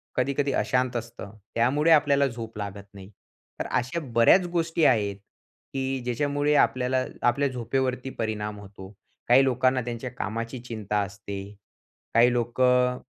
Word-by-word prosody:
कधी-कधी 140 +2 0
अशांत 125 -1 0
असतं. 115 -4 -6 0.2
त्यामुळे 145 +8 +2
आपल्याला 140 -2 +4
झोप 115 -3 -8
लागत 100 -1 -6
नाही. 95 0 -12 0.5
तर - - -2
अशा 125 +7 -1
बऱ्याच 145 +11 +5
गोष्टी 165 -1 +1
आहेत, 105 -5 +2 0.6
की 135 0 -2
ज्याच्यामुळे 145 +4 0
आपल्याला 130 -1 +2 0.2
आपल्या 140 +4 +2
झोपेवरती 130 +1 -2
परिणाम 105 -1 -3
होतो. 95 -1 -12 0.4
काही 130 +3 +6
लोकांना 130 0 +2
त्यांच्या 120 +1 -5
कामाची 115 +1 -4
चिंता 105 -3 -3
असते, 100 0 -6 0.7
काही 120 +2 +5
लोकं 125 +1 +2
125 Hz, 130 wpm, -26 LUFS, 110-135 Hz, 0.7 s, काही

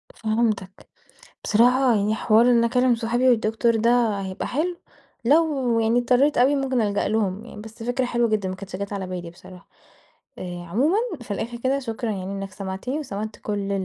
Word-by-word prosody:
فهمتك 215 -3 -2 0.5
بصراحة، 245 +2 +4
يعني 210 +1 +1
حوار 220 +1 +4
إني 235 -1 +4
أكلم 250 0 +2
صُحابي 240 +3 +1
والدكتور 225 0 +2
ده 225 -2 +2
هيبقى 190 -1 -4
حلو 340 +6 -2 0.5
لو، 275 -4 +2
يعني 225 +2 +2
اضطريت 255 +4 +2
أوي 265 +4 +4
مُمكن 265 -3 0
ألجأ 205 -1 0
لهُم 210 0 -1
يعني، 210 -3 -10
بس 225 +1 -10
فكرة 245 +2 -1
حلوة 240 -1 +1
جدًا، 205 -3 0
ما 185 - -4
كانتش 190 -1 -8
جات 200 +2 -5
على 190 -2 -4
بالي 180 -2 -6
بصراحة. 180 +1 -15 0.7
آآ 175 -1 -6
عمومًا 285 - +2 0.2
في 220 - -8
الآخر 235 +4 -4
كده، 260 +3 0
شكرًا 230 -3 -4
يعني 190 -1 -5
إنك 195 -1 -5
سمعتني، 195 +9 -4
وسمعت 215 -5 -5
كل 200 -1 -3
225 Hz, 175 wpm, -23 LUFS, 200-245 Hz, 0.7 s, بصراحة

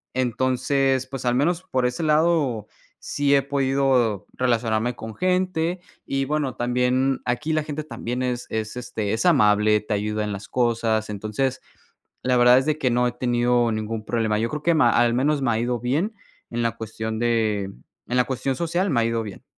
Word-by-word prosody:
entonces, 130 +1 +1
pues 135 -1 -6
al 120 0 +2
menos 170 +6 +1
por 130 -4 +1
ese 125 +3 -1
lado 150 -8 +2 0.3
sí 140 -1 +1
he 135 - +3
podido 135 -6 +1
relacionarme 120 -1 0
con 110 0 -8
gente 180 -1 0 0.3
y, 135 0 -1
bueno, 150 -2 -1
también 125 +2 +1
aquí 150 +6 -1
la 155 0 +1
gente 150 0 -5
también 125 -4 -4
es 125 -1 -2
es, 110 0 -3
este, 110 -4 -3
es 110 - -1
amable, 105 -8 +4
te 105 0 -3
ayuda 105 +1 -2
en 105 -1 -3
las 100 +1 -7
cosas. 115 -3 0
Entonces, 110 +6 -2 0.6
la 125 0 +2
verdad 125 +1 +7
es 135 - -3
de 155 -1 +1
que 130 - +1
no 125 +1 +2
he - - -1
tenido 120 -1 +1
ningún 110 0 -3
problema. 110 -2 0
Yo 115 +1 0
creo 150 0 -5
que 170 +1 +3
ma 145 -6 +5
al 120 0 +3
menos 140 +3 +1
me 120 - +2
ha 110 - 0
ido 120 0 -1
bien 150 - -1 0.4
en 120 0 -1
la 115 - +1
cuestión 110 0 -4
de 110 -4 +1 0.4
en 125 - -1
la 125 - +5
cuestión 130 0 -2
social, 175 +6 -1
me 120 -4 +2
ha - - +1
ido 115 0 0
bien. 105 -3 -9
125 Hz, 195 wpm, -23 LUFS, 115-135 Hz, 0.6 s, verdad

